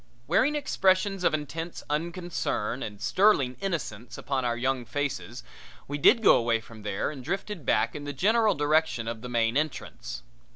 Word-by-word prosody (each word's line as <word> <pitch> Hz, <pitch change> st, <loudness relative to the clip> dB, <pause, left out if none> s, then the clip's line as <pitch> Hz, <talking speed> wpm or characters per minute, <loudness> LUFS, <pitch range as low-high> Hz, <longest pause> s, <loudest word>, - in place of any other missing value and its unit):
Wearing 220 Hz, -, +2 dB
expressions 195 Hz, -8 st, +1 dB
of -, -, +4 dB
intense 165 Hz, +3 st, -5 dB
unconcern 165 Hz, -, -2 dB
and 105 Hz, -2 st, -6 dB
sterling 130 Hz, -, +3 dB
innocence 120 Hz, -, -4 dB
upon 135 Hz, -2 st, -2 dB
our 120 Hz, -1 st, 0 dB
young 130 Hz, +1 st, 0 dB
faces 140 Hz, -, -4 dB, 0.4 s
we 145 Hz, +1 st, -4 dB
did 230 Hz, -, +5 dB
go -, -, +7 dB
away 115 Hz, -1 st, +1 dB
from 110 Hz, 0 st, -13 dB
there 105 Hz, +5 st, -2 dB
and 135 Hz, -4 st, -9 dB
drifted 185 Hz, -, -4 dB
back 110 Hz, +2 st, +2 dB
in 145 Hz, -, -6 dB
the 145 Hz, -, -3 dB
general 215 Hz, -, +3 dB
direction 145 Hz, -5 st, +1 dB
of 115 Hz, -1 st, -4 dB
the 125 Hz, -, -7 dB
main 115 Hz, -1 st, +1 dB
entrance. 150 Hz, -, -3 dB
145 Hz, 165 wpm, -27 LUFS, 120-175 Hz, 0.4 s, go